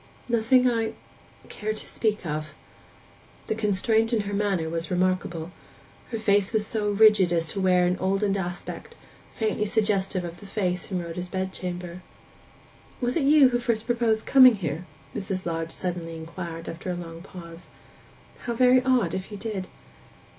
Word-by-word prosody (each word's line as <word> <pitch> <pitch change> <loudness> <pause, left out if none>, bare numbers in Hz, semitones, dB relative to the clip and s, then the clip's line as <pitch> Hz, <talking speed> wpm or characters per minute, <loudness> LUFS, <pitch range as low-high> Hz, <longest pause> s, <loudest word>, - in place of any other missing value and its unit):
'Nothing 240 +2 +4
I—care 220 -2 -4
to 215 - -5
speak 215 -4 -1
of.' 155 -1 -4 0.9
The - - -1
constraint 220 +2 +1
in 230 -3 +2
her 205 0 -5
manner 200 -5 0
was 165 +1 -3
remarkable; 180 -2 -1 0.6
her 230 - -3
face 205 -2 +2
was 215 -2 +1
so 210 -1 -1
rigid 205 -3 +5
as 165 -1 +1
to 195 - -2
wear 180 -1 +4
an 180 +1 +1
oldened 195 +1 +1
aspect, 180 -2 -5 0.4
faintly 215 -1 0
suggestive 200 -3 +1
of 170 0 -7
the 200 - -11
face 185 -2 -2
in 180 -2 -1
Rhoda's 170 +2 -5
bed 190 0 -3
chamber. 180 -1 -5 1.0
'Was 245 -1 -1
it 300 - +1
you 290 -2 +7
who 240 -1 0
first 230 -2 -1
proposed 230 -2 +1
coming 255 -3 +8
here?' 170 -2 -4 0.3
Mrs. 190 -2 -3
Lodge 165 -1 -2
suddenly 170 -2 -4
inquired, 165 0 -7
after 170 +3 -6
a 180 - -1
long 165 -1 -8
pause. 170 -2 -11 0.8
'How 240 - -1
very 255 +1 +5
odd, 250 -10 +2
if 190 0 -4
you 205 - -6
did! 200 -3 -4
195 Hz, 160 wpm, -26 LUFS, 175-220 Hz, 1.0 s, coming